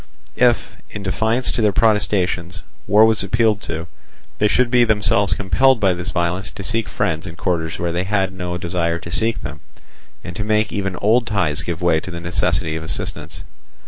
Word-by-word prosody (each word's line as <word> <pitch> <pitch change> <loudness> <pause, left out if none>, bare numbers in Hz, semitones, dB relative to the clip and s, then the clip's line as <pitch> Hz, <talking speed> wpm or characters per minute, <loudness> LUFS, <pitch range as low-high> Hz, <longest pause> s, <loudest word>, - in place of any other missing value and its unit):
If, 120 -1 +2
in 100 - -7
defiance 110 +2 0
of 115 - 0
their 105 -1 +3
protestations, 95 -5 0 0.2
war 105 +2 +6
was 110 -1 +2
appealed 110 +1 +1
to, 80 0 -3 0.5
they 105 - +4
should 125 +3 +2
be 125 -1 +5
themselves 105 -3 +2
compelled 130 +7 +3
by 95 -2 +3
this 90 +1 -5
violence 90 +3 -1
to 100 - -9
seek 110 +2 -1
friends 80 +1 -1
in 85 - -8
quarters 80 -2 -2
where 85 0 -2
they 90 +2 -1
had 95 -1 0
no 90 -1 -4
desire 85 -1 -1
to 85 0 -9
seek 115 +4 0
them, 70 +3 -6 0.6
and 85 - -8
to 105 - -3
make 110 0 +1
even 95 -2 -2
old 115 +5 +2
ties 90 -9 +1
give 85 +1 -4
way 85 -2 +3
to 85 - -9
the 85 -1 -6
necessity 85 -1 0
of 80 - -4
assistance. 80 - -4
95 Hz, 190 wpm, -20 LUFS, 85-110 Hz, 0.6 s, war